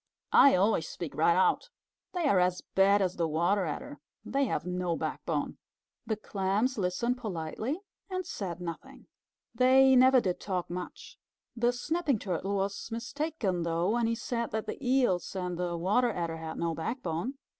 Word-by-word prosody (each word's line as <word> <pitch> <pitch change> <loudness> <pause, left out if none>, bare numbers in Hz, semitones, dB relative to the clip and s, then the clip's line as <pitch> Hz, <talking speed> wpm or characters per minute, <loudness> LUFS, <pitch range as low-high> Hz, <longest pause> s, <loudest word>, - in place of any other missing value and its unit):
"I 275 - +8
always 185 -3 +2
speak 170 -4 -6
right 170 +2 +3
out. 190 - +2 0.4
They 350 -4 0
are 200 -9 +4
as 180 0 +1
bad 195 +1 +5
as 185 -1 -2
the 170 -1 +1
Water 175 +5 +1
Adder. 145 -1 -6 0.3
They 275 +1 +1
have 230 - -2
no 180 -1 -1
backbone." - - -3 0.5
The 220 - 0
Clams 210 +4 -1
listened 220 +7 0
politely 215 - -4 0.3
and 370 -1 -3
said 180 -4 -5
nothing. 170 -2 -8 0.5
They 265 +1 +6
never 260 +1 +7
did 185 -6 -1
talk 180 -3 -3
much. 180 0 -7 0.4
The 240 +1 +2
Snapping 295 +2 0
Turtle 195 0 -2
was 195 +2 -2
mistaken 235 - -2
though, 170 +3 0
when 235 0 +1
he 230 - 0
said 235 0 -3
that 220 0 -3
the - - -6
Eels 245 -9 +1
and 180 -1 -2
the 175 0 -2
Water 210 +8 +2
Adder 170 -4 -3
had 160 0 -6
no 170 -1 -1
backbone. 180 - -3
195 Hz, 165 wpm, -30 LUFS, 175-245 Hz, 0.5 s, I